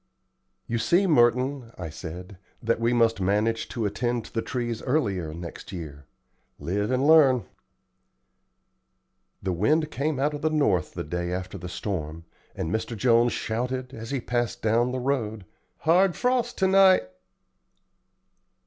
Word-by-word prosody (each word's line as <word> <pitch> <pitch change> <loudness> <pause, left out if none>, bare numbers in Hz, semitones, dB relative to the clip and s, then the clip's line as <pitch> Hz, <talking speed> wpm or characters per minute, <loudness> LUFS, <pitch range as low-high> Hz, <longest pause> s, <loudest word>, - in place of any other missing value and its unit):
"You 115 - -2
see, 180 - +3
Merton," 125 -4 +2
I 80 -4 -6
said, 90 +4 -8 0.2
"that 115 -1 0
we 115 +1 +1
must 115 -4 +2
manage 105 +4 0
to 115 -3 -3
attend 120 +3 -1
to - - -14
the 115 - 0
trees 120 -2 -3
earlier 100 - -1
next 85 +1 -8
year. 75 -6 -8 0.5
Live 100 +8 -2
and 130 +2 +1
learn." 145 -6 +6 2.0
The 95 -1 -1
wind 150 - +1
came 145 0 -1
out 145 +2 +1
of 145 - -5
the 155 - +2
north 125 - +1
the - - -3
day 85 +3 -3
after 90 0 -4
the 90 - -7
storm, 85 -4 -4 0.3
and 80 - -3
Mr. 110 +2 -2
Jones 120 +1 +3
shouted, 125 +3 -3
as 115 -2 -8
he 140 - -1
passed 120 -1 -2
down 115 +3 +2
the 130 - -2
road, 115 -6 -2 0.4
"Hard 175 +3 +4
frost 250 -1 0
to 190 - +3
night!" 190 -5 +6
115 Hz, 150 wpm, -26 LUFS, 95-135 Hz, 2.0 s, learn